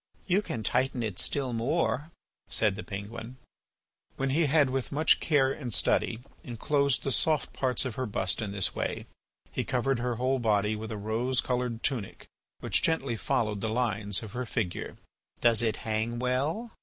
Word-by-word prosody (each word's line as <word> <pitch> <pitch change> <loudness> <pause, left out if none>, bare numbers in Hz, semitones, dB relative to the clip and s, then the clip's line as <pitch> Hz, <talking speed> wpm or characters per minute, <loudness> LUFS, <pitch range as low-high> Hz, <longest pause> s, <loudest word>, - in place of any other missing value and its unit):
"You 190 +2 +2
can 115 - -4
tighten 125 +1 +1
it 105 -5 -2
still 135 -4 +1
more," 145 +4 0 0.4
said 105 -3 +2
the 105 - -5
penguin. 110 +4 -7 0.8
When 135 0 0
he 155 +2 +3
had, 145 -2 +4
with 130 -1 -2
much 155 +3 +4
care 135 -4 +3
and 130 -4 -5
study, 110 +3 +2 0.2
enclosed 140 +3 0
the 135 - 0
soft 155 +1 +1
parts 130 -1 0
of 130 - -3
her 130 - -1
bust 95 0 +1
in 105 -3 -3
this 100 -2 +1
way, - - -3 0.5
he - - -2
covered 125 +1 0
her 120 0 -1
whole 130 +3 +1
body 105 -2 +2
with 110 +1 -6
a 110 - -4
rose 115 +5 0
coloured 125 -2 -1
tunic 120 -8 -2 0.4
which - - +2
gently 140 -7 +1
followed 110 -4 -1
the 110 - -1
lines 110 -3 0
of 110 - -8
her 125 +2 -4
figure. 100 -6 -3 0.4
"Does 115 -2 +4
it 110 -2 +1
hang 110 +2 -1
well?" 140 - -1
120 Hz, 175 wpm, -29 LUFS, 110-135 Hz, 0.8 s, had